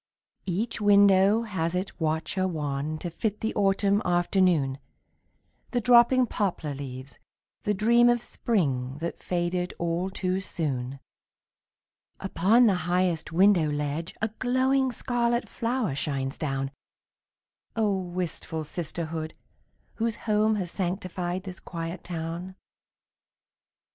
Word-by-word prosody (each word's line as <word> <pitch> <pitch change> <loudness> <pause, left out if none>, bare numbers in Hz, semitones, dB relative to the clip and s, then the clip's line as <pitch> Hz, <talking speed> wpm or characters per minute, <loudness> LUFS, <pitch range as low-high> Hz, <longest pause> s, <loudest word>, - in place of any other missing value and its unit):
Each 210 +6 -2
window 200 +1 +5
has 180 -6 -2
its 185 +2 -3
watcher 160 +4 0
wan 150 -2 -2
To 170 +2 -5
fit 210 +4 -2
the 220 - -1
autumn 200 0 +2
afternoon, 175 -6 +2 0.9
The 245 - 0
dropping 245 +2 +6
poplar 185 -9 -2
leaves, 130 -1 -8 0.5
the 210 - +1
dream 235 +4 +5
Of 240 -1 +2
spring 135 - -1
that 170 +2 -5
faded 180 0 -1
all 170 +2 -1
too 185 -1 -1
soon. 140 -7 -3 1.2
Upon 195 +6 +4
the 210 - +5 0.2
highest 175 -3 +1
window 180 -2 +4
ledge 150 +3 -3
A 220 - +2
glowing 260 +1 +2
scarlet 240 0 0
flower 235 - -1
shines 135 -1 -2
down. 135 -2 -2 1.0
Oh, 215 -3 +2
wistful 175 -3 -4
sisterhood, 160 0 -4 0.6
whose 230 -1 0
home 215 0 +1
Has 185 -4 -3
sanctified 185 -1 -3
this 185 -2 -7
quiet 165 0 -6
town! 170 +2 -5
180 Hz, 115 wpm, -27 LUFS, 160-210 Hz, 1.2 s, dropping